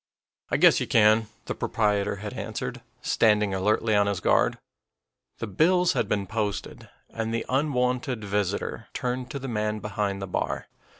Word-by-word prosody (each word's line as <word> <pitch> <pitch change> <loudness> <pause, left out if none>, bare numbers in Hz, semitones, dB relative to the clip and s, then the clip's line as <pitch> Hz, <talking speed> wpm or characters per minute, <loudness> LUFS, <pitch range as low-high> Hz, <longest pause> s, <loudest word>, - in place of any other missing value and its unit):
"I - - +1
guess - - +6
you - - -2
can," 110 0 +4 0.2
the - - -2
proprietor 105 -2 0
had 105 +3 -6
answered, 125 +2 -5 0.2
standing 105 -3 +3
alertly 105 +3 +1
on 100 0 +4
his 100 -2 -1
guard. - - +2 0.8
The - - -4
bills 175 - +3
had 110 - -1
been 100 -2 0
posted, 105 0 -4 0.2
and 115 0 -3
the 115 0 -2
unwonted 125 -4 0
visitor 100 -1 -2
turned 125 0 -2
to - - -4
the 135 0 -6
man 105 -2 -1
behind 105 -2 -2
the 95 - -4
bar. 90 - -2
110 Hz, 160 wpm, -26 LUFS, 105-125 Hz, 0.8 s, guess